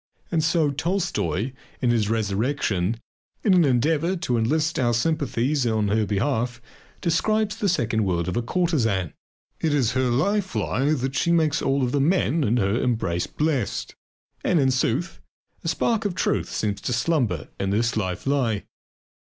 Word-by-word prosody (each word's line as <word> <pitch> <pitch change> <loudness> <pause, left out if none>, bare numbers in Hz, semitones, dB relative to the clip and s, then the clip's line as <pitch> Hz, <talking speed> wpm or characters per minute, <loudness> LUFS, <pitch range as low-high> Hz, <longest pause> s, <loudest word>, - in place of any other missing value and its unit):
And 165 -3 +1
so, 160 -1 +2
too, - - -3
Tolstoy, 135 - -1 0.3
in 125 - +2
his 110 -3 +1
"Resurrection," 110 -1 0 0.4
in 200 - +4
an 180 -2 +5
endeavour 150 +6 +2
to 130 -8 -1
enlist 155 +8 +1
our 120 -2 +2
sympathies 140 0 0
in 110 -3 +1
her 105 0 +1
behalf, 120 +3 -1 0.4
describes 210 +5 +1
the 210 -3 0
second 115 -9 +1
world 85 -3 0
of 90 - -2
a 120 - +1
courtesan. 115 - 0 0.5
It 155 -2 +1
is 125 -6 +2
her 130 0 +1
life 195 - 0
lie 140 +4 +1
that 135 -1 -2
she 170 - +1
makes 160 -3 +2
all 135 -1 +1
the 135 +3 0
men 165 0 +2
in 120 0 +2
her 105 +2 +1
embrace 95 -8 0
blessed. 150 -8 -1 0.5
And 175 - +2
in 135 -2 +3
sooth, 130 +6 -1 0.4
a - - -4
spark 225 -2 +1
of 200 -4 -2
truth - - 0
seems 105 -2 -2
to 125 - -2
slumber 120 - 0
in 95 - -1
this 115 +4 +1
life 95 -4 -2
lie. 130 -7 +1
130 Hz, 165 wpm, -24 LUFS, 110-160 Hz, 0.5 s, an